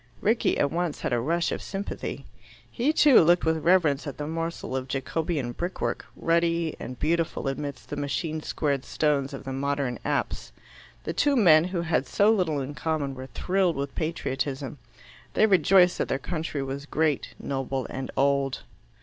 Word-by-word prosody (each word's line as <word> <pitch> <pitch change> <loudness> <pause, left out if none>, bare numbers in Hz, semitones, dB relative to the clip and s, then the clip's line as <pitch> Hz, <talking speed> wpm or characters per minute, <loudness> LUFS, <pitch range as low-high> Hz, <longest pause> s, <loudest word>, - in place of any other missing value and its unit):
Rickie 225 +3 +2
at 140 - +1
once 170 -2 -2
had - - -1
a 120 - +2
rush 170 +7 0
of - - -3
sympathy. 195 +1 -5 0.5
He, 260 +5 +1
too, 295 -4 +6
looked 175 +1 +4
with 160 0 +2
reverence 165 -5 +3
at 140 - -6
the 150 - -4
morsel 165 -3 -4
of 130 0 -3
Jacobean 135 0 -2
brickwork, 175 +8 -3
ruddy 170 -1 +1
and 125 - -7
beautiful 165 -1 0
amidst 135 -1 -4
the - - -3
machine 155 +2 -2
squared 140 -3 -1
stones 140 -3 0
of 135 - -7
the 135 - -5
modern 140 -2 -1
apse. - - -2 0.5
The - - -3
two 290 -1 +2
men, 165 -9 +6
who 180 -1 -2
had 160 -5 0
so 205 +2 +4
little 175 -9 +1
in 135 +2 -5
common, 150 -3 -2
were 130 0 -8
thrilled 185 +5 0
with 140 0 -3
patriotism. 140 -3 -3 0.6
They 215 - +5
rejoiced 185 -2 +5
that - - 0
their 135 - 0
country 155 -1 -3
was 135 +2 -5
great, 155 -3 0
noble, 135 -1 -3
and 130 0 -5
old. 140 -1 +1
155 Hz, 170 wpm, -26 LUFS, 135-170 Hz, 0.6 s, too